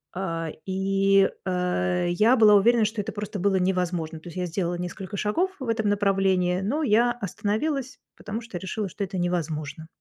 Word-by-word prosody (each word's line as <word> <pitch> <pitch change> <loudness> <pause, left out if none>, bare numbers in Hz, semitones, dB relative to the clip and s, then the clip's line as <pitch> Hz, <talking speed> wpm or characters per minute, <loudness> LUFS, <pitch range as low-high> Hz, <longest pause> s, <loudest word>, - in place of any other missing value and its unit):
а, 165 -3 -3 0.2
и, 195 +1 +3 0.2
э, 180 -1 0
я 215 +8 +4
была 215 -3 +7
уверена, 230 +3 +4
что 215 0 -2
это 200 - -5
просто 205 -1 -5
было 195 +1 +2
невозможно. 180 -3 -1
То 160 - -14
есть 170 - -10
я 180 - -1
сделала 175 0 -2
несколько 180 +2 -6
шагов 330 - 0
в 260 - -5
этом 220 -2 +1
направлении, 195 -3 +2
но 270 +11 -1
я 240 -1 +4
остановилась, 240 - -2 0.2
потому 210 +2 -5
что 225 -5 -7
решила, 195 +3 -4
что 200 - -5
это 190 -1 -4
невозможно. 160 -3 -3
195 Hz, 175 wpm, -25 LUFS, 180-215 Hz, 0.2 s, была